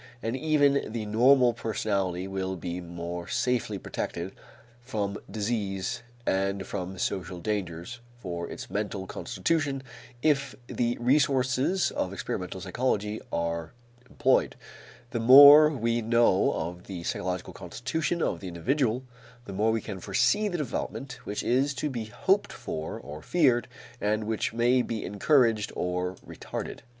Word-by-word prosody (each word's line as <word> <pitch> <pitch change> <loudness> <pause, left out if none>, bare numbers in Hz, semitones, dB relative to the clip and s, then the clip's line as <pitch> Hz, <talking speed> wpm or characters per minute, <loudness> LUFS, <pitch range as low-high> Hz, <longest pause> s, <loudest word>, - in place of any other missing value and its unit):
And 115 +2 -1
even 145 -3 +2
the 110 -1 -3
normal 120 +3 +5
personality 100 -5 -1
will 95 -1 -3
be 90 0 -5
more 85 0 -6
safely 120 -5 0
protected 85 0 -4 0.5
from 105 -5 -3
disease 105 +1 -2 0.2
and 95 0 0
from 95 -1 -5
social 90 -1 -3
dangers 100 +2 -3 0.2
for 85 -6 -5
its - - -7
mental 100 -2 -2
constitution 145 - -1 0.4
if 140 -4 +2
the 120 0 -1
resources 135 +5 +2
of 95 - -2
experimental 95 -1 -4
psychology 105 +1 -1
are 85 +1 -2 0.4
employed. - - +2 0.6
The 120 - -1
more 145 +5 +10
we 120 -5 0
know 115 -3 +3
of 85 +2 -5
the 90 -3 -6
psychological 90 +1 -3
constitution 135 - -2
of 85 - -1
the 95 - -7
individual, 125 - 0 0.4
the 100 - -7
more 110 +4 +2
we 110 0 0
can 100 -3 -6
foresee 205 - +2
the 180 -3 -2
development 135 -3 -4
which 105 - -3
is 135 +3 +2
to 145 +2 -2
be 115 -4 -4
hoped 105 - +1
for 80 0 -5
or 75 +1 -9
feared 130 - +2 0.3
and 105 +1 +1
which 110 0 -1
may 120 +2 +3
be 115 -3 -3
encouraged 115 0 +2
or 90 +1 -2
retarded. - - -6
110 Hz, 135 wpm, -28 LUFS, 95-130 Hz, 0.6 s, more